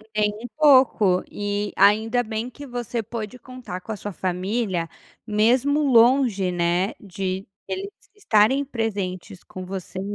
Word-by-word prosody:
Nem 210 -1 +2
um - - -5
pouco, 255 -11 +5
e, 205 0 -2
ainda 220 +4 +4
bem 220 +1 -4
que 285 +3 -11
você 240 -1 -3
pôde 225 +2 -7
contar 255 -7 -8
com 225 - -8
a - - -4
sua 205 0 -6
família 185 0 -2 0.4
mesmo 245 +7 +2
longe, 240 -6 +4
né, 175 +3 0
de 190 -1 -4 0.2
eles 390 +1 -4 0.3
estarem 260 - +3
presentes 200 -7 -4
com 185 0 -9
você, 190 0 -6
215 Hz, 135 wpm, -23 LUFS, 190-245 Hz, 0.4 s, pouco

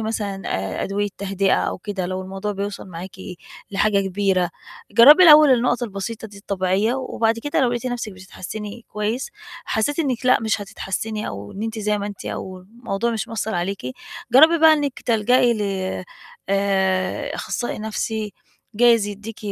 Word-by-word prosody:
مثلًا 210 -3 -3
آآ 95 0 -2
أدوية 205 +1 -1
تهدئة 195 0 +1
أو - - -1
كده 190 -2 -4
لو 185 +1 -3
الموضوع 195 +2 -4
بيوصل 200 +1 -5
معاكِ 180 +2 -8 0.5
لحاجة 200 0 +2
كبيرة، 190 -2 0 0.4
جرّبي 265 - +8
الأول 305 -4 +9
النقط 245 0 +2
البسيطة 220 +1 -5
دي 200 -1 -13
الطبيعية 200 +4 0
و 265 -1 -4
وبعد 225 0 +1
كده 290 +4 -1
لو 255 - +3
لقيتِ 240 +1 -3
نَفْسك 240 -4 -3
بتتحسّني 205 +4 -8
كويس، 220 - -3 0.3
حسّيتِ 280 +8 -1
إنِك 255 -5 -1
لأ، 255 - +5
مش 220 -1 0
هتتحسّني 215 +1 -4
أو 100 +1 -7
إن 205 - -6
أنتِ 225 0 -4
زي 210 0 0
ما 200 - -3
أنتِ 205 -2 -8
أو 185 -1 -5
الموضوع 220 +3 -4
مش 220 -2 -3
مأثّر 220 -2 -3
عليكِ 185 +3 -2 0.5
جربي 315 +6 +7
بقى 320 0 +7
إنك 290 -4 -1
تلجأي 240 +2 +3
ل 210 - -3 0.9
آآ 190 -1 0
أخصائي 240 - -3
نَفْسي 220 -1 -3 0.4
جايز 230 -1 +4
يدّيكِ 210 +2 -8
210 Hz, 160 wpm, -22 LUFS, 195-235 Hz, 0.9 s, الأول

